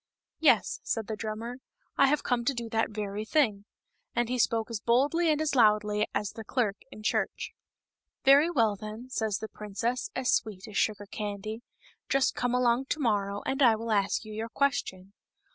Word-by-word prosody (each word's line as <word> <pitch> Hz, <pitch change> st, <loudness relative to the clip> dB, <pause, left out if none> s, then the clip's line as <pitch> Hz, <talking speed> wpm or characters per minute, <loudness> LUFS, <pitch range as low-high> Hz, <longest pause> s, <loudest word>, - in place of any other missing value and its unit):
" -, -, -64 dB
Yes," -, -, +3 dB
said 225 Hz, -2 st, -2 dB
the 220 Hz, -, -4 dB
drummer, 225 Hz, +3 st, -5 dB, 0.2 s
" -, -, -42 dB
I 275 Hz, -, +5 dB
have 295 Hz, +2 st, +1 dB
come 245 Hz, -2 st, 0 dB
to 275 Hz, -, +1 dB
do 235 Hz, -1 st, -4 dB
that 225 Hz, 0 st, +1 dB
very 210 Hz, -1 st, -4 dB
thing." 220 Hz, -6 st, +1 dB, 0.5 s
And 240 Hz, 0 st, +1 dB
he 250 Hz, 0 st, -1 dB
spoke 230 Hz, 0 st, +1 dB
as 225 Hz, -, -2 dB
boldly 285 Hz, +10 st, +2 dB
and 305 Hz, -1 st, +2 dB
as 310 Hz, -1 st, 0 dB
loudly 210 Hz, -3 st, +3 dB
as 205 Hz, 0 st, -2 dB
the 225 Hz, -, -8 dB
clerk 215 Hz, -3 st, 0 dB
in 215 Hz, -, -11 dB
church. -, -, -1 dB, 0.7 s
"Very 280 Hz, +4 st, +7 dB
well, 230 Hz, -10 st, +2 dB
then," 215 Hz, +5 st, -8 dB
says 220 Hz, -5 st, 0 dB
the 220 Hz, -, -6 dB
princess, 230 Hz, -, -3 dB
as 260 Hz, -1 st, +1 dB
sweet 205 Hz, -4 st, -1 dB
as 210 Hz, -, -10 dB
sugar 205 Hz, -1 st, 0 dB
candy, 210 Hz, +1 st, -5 dB, 0.5 s
"just 275 Hz, -1 st, +2 dB
come 245 Hz, 0 st, 0 dB
along 250 Hz, +1 st, +2 dB
to 300 Hz, -, -2 dB
morrow, 205 Hz, -5 st, 0 dB
and 270 Hz, +2 st, -1 dB
I 235 Hz, -4 st, +6 dB
will 225 Hz, +1 st, -4 dB
ask 200 Hz, +1 st, +1 dB
you 215 Hz, -, -8 dB
your 220 Hz, +2 st, -4 dB
question." 200 Hz, -9 st, -1 dB
225 Hz, 195 wpm, -29 LUFS, 210-250 Hz, 0.7 s, Very